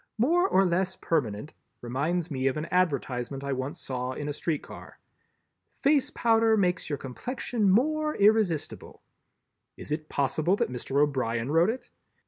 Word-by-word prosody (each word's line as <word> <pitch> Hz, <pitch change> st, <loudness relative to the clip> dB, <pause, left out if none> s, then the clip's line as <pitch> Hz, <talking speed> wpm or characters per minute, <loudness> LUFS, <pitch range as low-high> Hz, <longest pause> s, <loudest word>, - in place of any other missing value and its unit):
"More 340 Hz, -, +3 dB
or 195 Hz, -, +4 dB
less 185 Hz, +1 st, 0 dB
permanent" 130 Hz, -5 st, -2 dB, 0.3 s
reminds 155 Hz, +8 st, -2 dB
me 130 Hz, -1 st, 0 dB
of 135 Hz, -, 0 dB
an 150 Hz, -, -3 dB
advertisement 140 Hz, -6 st, 0 dB
I 140 Hz, 0 st, -2 dB
once 135 Hz, +6 st, -4 dB
saw 130 Hz, -2 st, -3 dB
in 145 Hz, +2 st, -5 dB
a 145 Hz, -, -2 dB
street 150 Hz, 0 st, -2 dB
car: -, -, -11 dB, 0.8 s
"Face 285 Hz, -1 st, +2 dB
Powder 225 Hz, -1 st, +3 dB
makes 180 Hz, -5 st, 0 dB
your 145 Hz, -, -1 dB
complexion 215 Hz, -, -2 dB
more 305 Hz, +9 st, +2 dB
irresistible." 205 Hz, -6 st, +1 dB, 0.7 s
Is -, -, -8 dB
it 155 Hz, 0 st, -3 dB
possible 155 Hz, +6 st, +1 dB
that 200 Hz, -, -1 dB
Mr. 130 Hz, +3 st, -2 dB
O'Brien 130 Hz, -4 st, 0 dB
wrote 165 Hz, +5 st, +4 dB
it? 250 Hz, +4 st, -5 dB
160 Hz, 150 wpm, -27 LUFS, 135-210 Hz, 0.8 s, or